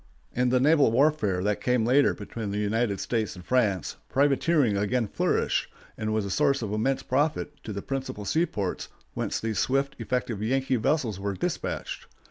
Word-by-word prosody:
In 125 +1 +2
the 125 +1 +3
naval 145 0 +5
warfare 115 -8 +2
that 105 0 0
came 125 -3 +2
later 135 +4 +4
between 105 +1 -6
the 100 - -2
United 105 -1 0
States 110 -4 -1
and 90 -1 -11
France, 105 - +1
privateering 140 -3 +3
again 110 +4 +1
flourished, - - 0 0.2
and 110 0 -3
was 110 -1 0
a 100 - -4
source 140 +1 +2
of 105 -1 -3
immense 130 +5 0
profit 145 +4 0
to 110 - -4
the 100 -1 -5
principal 135 -6 -4
seaports 105 - -1 0.2
whence - - -2
these 110 -1 -2
swift, 135 +1 +1
effective 120 -2 -2
Yankee 130 +3 +1
vessels 120 - 0
were 100 0 -2
despatched. - - -3
120 Hz, 170 wpm, -27 LUFS, 105-135 Hz, 0.2 s, naval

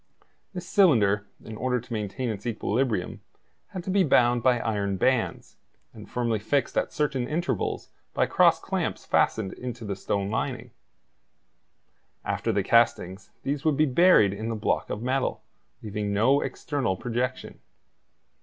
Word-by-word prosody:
This 180 0 -6
cylinder, 105 - +3 0.2
in 110 - -8
order 125 +1 0
to 120 +1 -9
maintain 110 +4 -3
its 105 0 -5
equilibrium, 115 -3 -1 0.5
had 185 - -7
to 185 - -3
be 195 0 +4
bound 120 -5 +3
by 125 0 +3
iron 100 -4 -1
bands, 130 +4 0 0.4
and 105 -2 -12
firmly 120 -3 -1
fixed 120 +5 -1
at - - 0
certain 140 -5 -1
intervals 150 - -2 0.3
by - - +3
cross - - +4
clamps - - -3
fastened 100 -4 +1
into 120 -2 -7
the 100 -1 -3
stone 100 +1 -2
lining; 110 - -3 1.5
after - - -1
the - - 0
castings 105 -5 +1
these 140 0 -2
would 155 -3 +2
be 155 - +4
buried 135 - +5
in 110 +3 -5
the 115 - -2
block 110 - -1
of 105 - -4
metal, 130 +1 -1 0.4
leaving 105 -1 -3
no 120 +8 +3
external 130 - -2
projection. 125 +3 -3
120 Hz, 145 wpm, -26 LUFS, 105-135 Hz, 1.5 s, buried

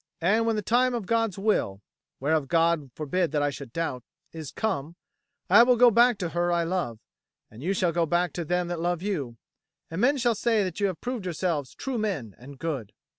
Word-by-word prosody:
And 215 +7 +2
when 225 - +2
the 210 - -2
time 250 +3 +2
of 230 -5 -3
God's 225 -2 0
will 195 - 0 0.4
whereof 145 +1 +1
God 165 -3 +2
forbid 165 +2 -1
that 145 -1 +1
I 145 - +1
should 140 -3 -9
doubt 130 -5 -3 0.3
is 160 -4 -7
come, 170 -7 -3 0.5
I 205 +5 +8
will 245 +1 +5
go 245 0 +6
back 240 +1 +5
to 175 -4 -3
her 175 +1 0
I 170 -1 +2
love, 165 -10 -2 0.5
and 110 +3 -12
you 190 +6 -1
shall 180 -2 +1
go 165 0 +1
back 175 +1 +1
to 175 - -3
them 180 +2 -1
that 175 -1 -3
love 175 +1 -1
you; 145 - -3 0.5
and 165 +4 -3
men 275 +4 +4
shall 240 -2 +2
say 225 0 +1
that 185 -1 -4
you 200 - +2
have 185 -4 -5
proved 245 -5 -4
yourselves 165 -5 -2
true 260 -4 -3
men 170 - -2
and 135 +3 -12
good." 140 -9 -4
175 Hz, 215 wpm, -26 LUFS, 155-215 Hz, 0.5 s, I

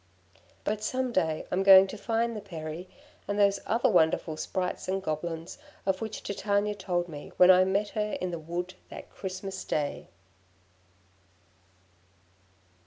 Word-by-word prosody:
But 210 0 -1
some 255 +2 -1
day 160 -7 0
I'm 180 - +1
going 195 -1 +9
to 195 - -7
find 230 +2 -1
the 210 - -5
Peri, 170 -2 -7 0.4
and 205 +1 -2
those 200 -1 +4
other 230 +2 +2
wonderful 160 -4 +2
Sprites 180 +3 -3
and 190 +1 0
Goblins 165 -1 -4 0.3
of 190 -1 0
which 220 -1 -5
Titania 205 +1 0
told 180 -3 -2
me 150 -3 -9
when 180 0 +8
I 185 0 +6
met 200 +2 0
her 210 0 -2
in 180 -1 -2
the 170 - -4
wood 175 +3 -4 0.2
that - - -10
Christmas 190 0 -6
day. 145 -2 -2
190 Hz, 145 wpm, -28 LUFS, 175-205 Hz, 0.4 s, going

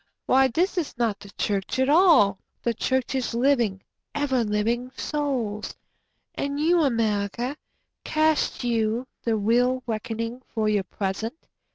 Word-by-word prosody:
Why 265 +1 +5
this 355 - 0
is 305 -6 -5
not 230 -4 0
the 200 - -12
church 200 +3 -1
at 260 0 +2
all—the 270 - +3
Church 260 +3 -1
is 255 -3 -1
living, 235 -7 +2 0.3
ever 270 -4 +1
living 230 +4 -1
Souls.")And 280 +1 -4
you, 335 +3 +3
America, 230 -1 0 0.5
Cast 310 -3 +1
you 230 0 0 0.2
the 230 -2 0
real 245 +4 +2
reckoning 230 +1 -4
for 220 -1 +1
your 205 -2 +1
present? 200 - -3
240 Hz, 125 wpm, -25 LUFS, 215-270 Hz, 0.5 s, Why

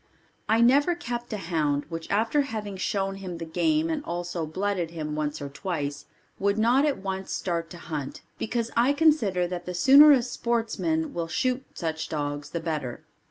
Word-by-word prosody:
I 225 +1 +4
never 285 +8 +5
kept 240 -7 -5
a 215 - -2
hound 155 -6 0
which 165 -1 -6
after 225 +8 +2
having 215 -7 -4
shown 195 +1 -1
him 185 -3 -6
the 165 - -5
game 310 - +1
and 305 -2 -2
also 175 - -3
blooded 185 +1 -1
him 155 -2 -5
once 150 0 -2
or 145 - -5
twice 145 -1 -4 0.3
would 200 +1 +1
not 245 +7 +4
at 285 - 0
once 190 0 -4
start 170 -2 -2
to 175 - -9
hunt 150 -5 -5 0.2
because 230 0 -2
I 245 +4 +4
consider 280 - +3
that 175 0 -5
the 180 - -4
sooner 275 +10 +8
a 260 -4 +5
sportsman 245 +7 -1
will 170 -1 -2
shoot 255 +9 0
such 160 -2 -3
dogs 145 -1 -3
the 170 - -3
better. 150 -7 -4
195 Hz, 180 wpm, -26 LUFS, 165-240 Hz, 0.3 s, sooner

